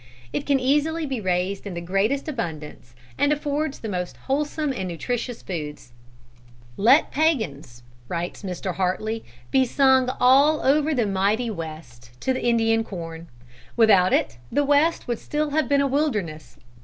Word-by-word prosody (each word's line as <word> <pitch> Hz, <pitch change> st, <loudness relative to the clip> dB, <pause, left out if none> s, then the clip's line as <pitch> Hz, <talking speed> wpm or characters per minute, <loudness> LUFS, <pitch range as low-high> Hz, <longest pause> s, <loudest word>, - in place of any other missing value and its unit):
It 285 Hz, -, -3 dB
can 280 Hz, -1 st, +3 dB
easily 300 Hz, +5 st, +1 dB
be 265 Hz, -5 st, -3 dB
raised 185 Hz, +2 st, -1 dB
in 185 Hz, -, -6 dB
the -, -, -3 dB
greatest 195 Hz, -, 0 dB
abundance, 155 Hz, -, -6 dB, 0.2 s
and 285 Hz, -, +3 dB
affords 295 Hz, 0 st, -1 dB
the 225 Hz, -, -7 dB
most 180 Hz, -3 st, -4 dB
wholesome 295 Hz, +1 st, -1 dB
and 190 Hz, -7 st, -4 dB
nutritious 240 Hz, +7 st, -4 dB
food. 150 Hz, -5 st, -5 dB, 1.0 s
"Let 245 Hz, +9 st, +4 dB
pæans," 170 Hz, -, -1 dB, 0.2 s
writes 170 Hz, +3 st, -4 dB
Mr. 185 Hz, -1 st, -4 dB
Hartly, 215 Hz, +4 st, -1 dB, 0.3 s
"be 265 Hz, -, +4 dB
sung 260 Hz, 0 st, +3 dB
all 280 Hz, +5 st, +5 dB
over 300 Hz, +3 st, +2 dB
the 240 Hz, -4 st, +1 dB
mighty 205 Hz, +4 st, 0 dB
West, 140 Hz, -, -9 dB
to 260 Hz, -1 st, 0 dB
Indian 225 Hz, -1 st, +2 dB
Corn. 165 Hz, -5 st, -8 dB, 0.5 s
Without 200 Hz, -5 st, +5 dB
it, 120 Hz, -, 0 dB
the 290 Hz, -, +2 dB
West 290 Hz, +4 st, +2 dB
would 240 Hz, -2 st, -2 dB
still 300 Hz, 0 st, -2 dB
have 310 Hz, 0 st, 0 dB
been 280 Hz, -1 st, +3 dB
a 280 Hz, -, +2 dB
wilderness. 215 Hz, -, -2 dB
225 Hz, 150 wpm, -24 LUFS, 180-280 Hz, 1.0 s, all